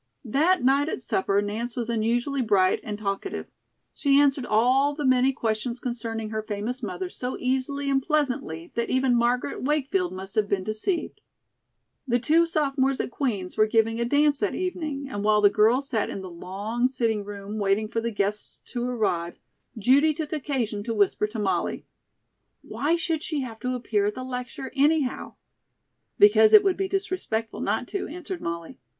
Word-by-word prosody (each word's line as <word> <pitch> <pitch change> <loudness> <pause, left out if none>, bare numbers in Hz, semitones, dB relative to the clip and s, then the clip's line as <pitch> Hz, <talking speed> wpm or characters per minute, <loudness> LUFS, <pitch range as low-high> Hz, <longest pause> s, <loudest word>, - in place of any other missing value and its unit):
That 310 +7 +2
night 280 +4 +3
at - - -3
supper 200 -3 0
Nance 225 +4 -4
was 235 -2 -3
unusually 240 +4 0
bright 200 -5 +3
and 210 -1 -5
talkative. 205 - -3 0.5
She 280 -2 +3
answered 275 -3 +2
all 255 +6 +3
the 295 -1 -3
many 255 0 +4
questions 235 -1 -2
concerning 225 -3 -4
her 220 0 -2
famous 215 +4 -4
mother 185 -4 -4
so 250 +7 -5
easily 265 +2 -1
and 270 -1 +2
pleasantly 255 - -1
that 235 0 -2
even 260 -1 +2
Margaret 240 +1 0
Wakefield 300 +6 0
must 190 +1 -8
have 215 -2 +1
been 195 -2 0
deceived. 220 - -2 0.9
The 240 -1 +3
two 320 +7 +3
sophomores 275 -4 0
at - - -2
Queen's 210 -9 -3
were 215 - +4
giving 225 +1 +2
a 235 - +1
dance 290 +2 +3
that 205 - -1
evening, 310 -7 -3
and 205 -6 -4
while 210 0 +4
the 205 -1 +5
girls 235 +7 +3
sat 220 -5 0
in 195 - -5
the 185 - -8
long 205 +8 -2
sitting 230 -5 -1
room 205 +1 -6
waiting 200 +2 +1
for 230 +1 -2
the 235 - -1
guests 205 -1 -2
to 240 -1 -3
arrive, 210 -9 -1 0.4
Judy 280 +8 +4
took 315 -1 -4
occasion 250 -8 -2
to 230 - -2
whisper 210 0 +2
to 220 +2 -8
Molly: 205 -3 -1 0.8
"Why 310 +4 0
should 330 -2 -1
she 305 -3 -2
have 230 -4 -7
to 250 +1 -2
appear 215 -4 0
at 210 - -2
the 255 - -5
lecture, 255 +1 -6
anyhow?" 290 -1 +1 0.8
"Because 420 +1 +6
it 425 -1 +9
would 385 -2 +2
be 385 0 -1
disrespectful 370 - -2
not - - -1
to," 395 - -3
answered 355 +3 -7
Molly. 170 0 -5
245 Hz, 175 wpm, -25 LUFS, 215-280 Hz, 0.9 s, it